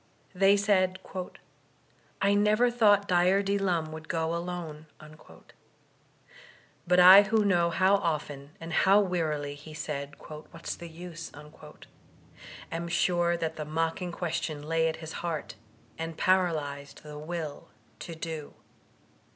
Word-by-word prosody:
They 195 +2 +4
said: 190 -2 +2 1.3
''I 200 +1 +4
never 215 +4 +3
thought 205 -4 +4
Dyer 180 +2 +3
D. 200 +1 0
Lum 170 -5 0
would 155 0 -9
go 165 0 -1
alone.*' 170 -3 -5 2.0
But 180 +1 +4
I 185 +2 +10
who 215 +1 +1
know 175 -3 +3
how 190 +4 +3
often 150 -6 -3
and 165 0 -7
how 195 +4 +5
wearily 155 -7 -1
he 150 +2 -12
said 145 -2 -5
*'\\liat*s 155 +2 -8
the 170 - -10
use," 165 0 -9 1.4
am 170 +1 -3
sure 175 0 +1
that 160 -1 -3
that 150 -1 -5
mocking 165 +3 -2
question 165 -3 -3
lay 165 +1 +1
at 160 - -3
his 160 - -7
heart, 165 -3 -4 0.5
and 165 0 -5
paralyzed 155 -7 0
the 150 -1 -9
will 155 -2 -6 0.3
to 170 - -7
do. 160 -2 -6
170 Hz, 125 wpm, -28 LUFS, 155-185 Hz, 2.0 s, I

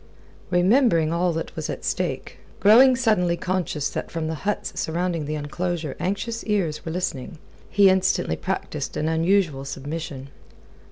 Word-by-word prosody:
Remembering 180 - +3
all 175 +1 +1
that 165 0 -5
was - - -4
at - - -5
stake, - - -3 0.2
growing 250 +6 +7
suddenly 210 -9 +2
conscious 180 -6 -1
that - - -4
from 165 -1 -3
the 160 - -2 0.2
huts 205 - -2
surrounding 170 -1 -1
the 155 +1 -3
enclosure 155 0 -3
anxious 215 +5 -2
ears 185 -8 -1
were 160 - -4
listening, 165 -3 -3 0.3
he 200 -1 +5
instantly 185 - +2
practised - - -4
an 155 - -1
unusual 165 -3 +1
submission. 140 0 -6
175 Hz, 145 wpm, -24 LUFS, 155-195 Hz, 0.3 s, growing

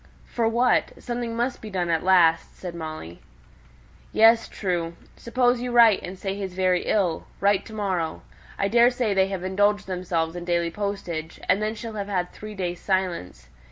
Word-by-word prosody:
"For 230 -2 -1
what? 240 +2 +2
Something 240 -1 -4
must 240 +2 -2
be 215 - -7
done 180 -3 -1
at 165 - +1
last," 170 -3 +3
said 180 -2 -6
Molly. 155 - -7 0.9
"Yes; 225 +1 +5
true. 170 -4 -3 0.2
Suppose 245 0 +1
you 250 0 -3
write, 230 -4 +6
and 185 +2 -7
say 195 +1 -3
he's 195 -2 -5
very 185 -1 +1
ill; 180 -6 0
write 200 -1 +2
to 220 - -11
morrow. 185 -6 -2 0.3
I 195 - +1
daresay 240 0 +3
they've 190 -1 0
indulged 205 +2 +1
themselves 175 -3 -2
in 175 - -5
daily 170 -1 0
postage, 175 -5 -4
and 200 - +3
then 215 +1 -1
she'll 225 0 -7
have 200 -2 -4
had 180 -3 -1
three 215 0 -9
days' 180 -2 -3
silence. 175 - -2
190 Hz, 170 wpm, -25 LUFS, 175-220 Hz, 0.9 s, write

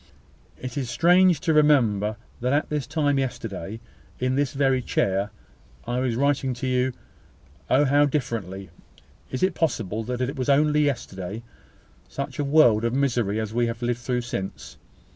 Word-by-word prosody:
It 130 - -5
seems 135 -4 -3
strange 175 +6 +4
to 160 - +1
remember 115 -9 +3 0.2
that 125 +2 0
at 145 - +1
this 150 -4 -2
time 145 -3 +1
yesterday, 110 -5 -4 0.4
in 130 0 0
this 140 +2 0
very 135 -2 +2
chair, 100 -3 0 0.6
I 120 +1 -1
was 125 -3 0
writing 135 -1 +1
to 120 - -5
you. 130 0 +1 0.8
Oh 140 +3 +4
how 145 +2 +4
differently! 100 - -3 0.6
Is 130 - -3
it 185 -1 +3
possible 115 - -1
that 125 +1 -3
it 130 +3 -2
was 130 0 -2
only 150 +1 +4
yesterday 105 -6 -4 0.7
such 140 -1 -5
a - - +1
world 140 -7 +4
of 115 +1 0
misery 120 -6 +1
as 110 -1 -4
we 120 0 +1
have 115 +1 -5
lived 120 0 0
through 125 0 -1
since? 100 -5 -6
130 Hz, 160 wpm, -24 LUFS, 115-145 Hz, 0.8 s, strange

